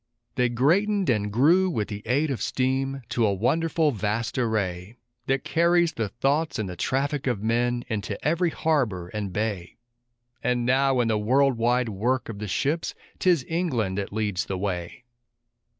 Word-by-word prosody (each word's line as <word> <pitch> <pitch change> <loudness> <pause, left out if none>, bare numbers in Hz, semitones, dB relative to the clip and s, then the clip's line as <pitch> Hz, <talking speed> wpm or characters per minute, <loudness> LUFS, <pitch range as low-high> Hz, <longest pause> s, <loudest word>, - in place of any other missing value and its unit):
They 125 -1 +1
greatened 180 - +2
and 105 -2 0
grew, 165 - +4
with 110 - -1
the 105 0 -5
aid 140 +5 +1
of 120 -7 -3
steam, 135 +2 -1
to 120 -1 0
a 105 - +3
wonderful, 155 - +1
vast 110 0 -2
array, 105 -4 -2 0.3
That 135 0 +1
carries 170 0 +2
the 110 -6 -2
thoughts 140 +8 0
and 110 - -2
the 90 - -6
traffic 140 - -1
of 115 -5 -1
men 120 +2 +1
into 110 -2 -3
every 170 +2 +2
harbor 125 - 0
and 105 -1 -4
bay; 100 -3 -3 0.7
And 125 0 +1
now 130 0 +3
in 120 - +1
the 110 -2 +1
world 130 +5 +3
wide 120 +1 +1
work 120 +6 -1
of 105 -3 -6
the 105 - -4
ships 145 - -1 0.2
'tis 175 -7 +3
England 125 - -1
that 100 - -4
leads 105 -3 -1
the 95 - -3
way. 90 +3 -4
120 Hz, 165 wpm, -25 LUFS, 105-140 Hz, 0.7 s, grew